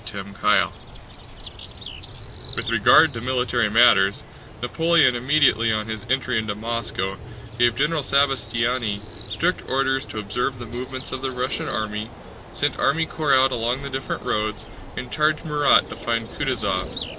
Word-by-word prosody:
CHAPTER 100 -2 -6 0.3
IX - - -3 1.8
With - - -2
regard - - +5
to 115 - -6
military 125 -2 0
matters, 110 -3 +4 0.4
Napoleon 160 +2 +3
immediately 125 -3 +3
on 110 -1 -1
his 110 0 -6
entry 130 -2 +1
into 110 -2 -3
Moscow 105 -4 -3 0.4
gave 120 -1 +3
General 150 +4 +1
Sabastiani 125 -5 +1 0.3
strict 180 +2 0
orders 135 0 +1
to - - -9
observe 110 +5 -2
the 120 - -8
movements 130 +3 -6
of 130 - -5
the 135 - -2
Russian 125 0 -2
army, 105 0 -3 0.4
sent - - -1
army 160 +3 +2
corps 150 -4 +1
out 130 0 +4
along 120 +2 -1
the 140 - -6
different 135 0 -4
roads, 105 0 -2 0.3
and 125 - -6
charged 155 +1 +1
Murat 150 -2 +3
to - - -7
find - - -2
Kutúzov. - - -2
125 Hz, 145 wpm, -22 LUFS, 110-135 Hz, 1.8 s, regard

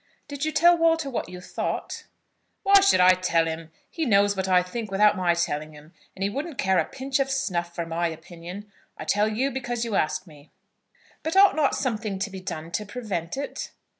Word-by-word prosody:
"Did 285 -1 -5
you 310 - 0
tell 345 +3 +5
Walter 325 -4 +2
what 240 - -3
you 180 0 -8
thought?" 180 - -4 0.6
"Why 395 0 +7
should 395 - +4
I 180 0 +8
tell 175 -3 +1
him? 160 0 -5 0.2
He 325 - -4
knows 205 -5 +3
what 190 0 -2
I 180 -1 +4
think 215 +4 -5
without 205 +2 +4
my 180 -3 +2
telling 155 -2 -2
him; 150 +3 -15 0.2
and 195 - -4
he 200 - +1
wouldn't 280 +4 -5
care 190 -1 +2
a - - +1
pinch 265 +1 -3
of 270 0 +1
snuff 175 -10 -2
for 170 - -3
my 165 +1 -1
opinion. 170 +5 -9 0.3
I 155 - -7
tell 205 +6 +2
you 245 +6 0
because 240 -2 -3
you 230 - -4
ask 155 -2 0
me." 150 -3 -17 0.7
"But 320 +3 -3
ought 395 +1 +7
not 300 -3 +2
something 215 -6 -2
to 195 +2 -3
be 190 - -7
done 165 -3 -6
to 190 +5 -2
prevent 205 -6 -4
it?" 280 - -5
200 Hz, 210 wpm, -25 LUFS, 170-265 Hz, 0.7 s, I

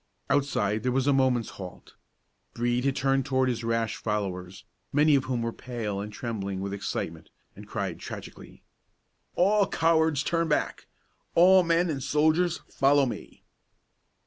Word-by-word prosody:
Outside 110 -7 +1
there 125 - 0
was 130 +1 +1
a 145 - +4
moment's 130 -3 +2
halt. 90 -2 -10 0.6
Brede 120 +2 0
had 135 -1 +1
turned 135 0 +1
toward 130 -1 +1
his 120 -1 -3
rash 115 -1 -1
followers, 95 -4 -4 0.3
many 150 +2 +4
of 135 -2 +3
whom 125 -3 -2
were 115 0 -2
pale 115 -5 -4
and 105 +1 -6
trembling 100 -4 -4
with 100 +1 -4
excitement, 100 - -4 0.3
and - - -12
cried - - -4
tragically: - - -10 0.7
"All 200 +2 +3
cowards 160 -3 +2
turn 165 +1 0
back! 150 - -1 0.5
All 185 +2 +7
men 170 0 +2
and 140 -3 -4
soldiers 155 +5 +2
follow 140 +1 +3
me!" 120 - -7
130 Hz, 145 wpm, -27 LUFS, 115-150 Hz, 0.7 s, All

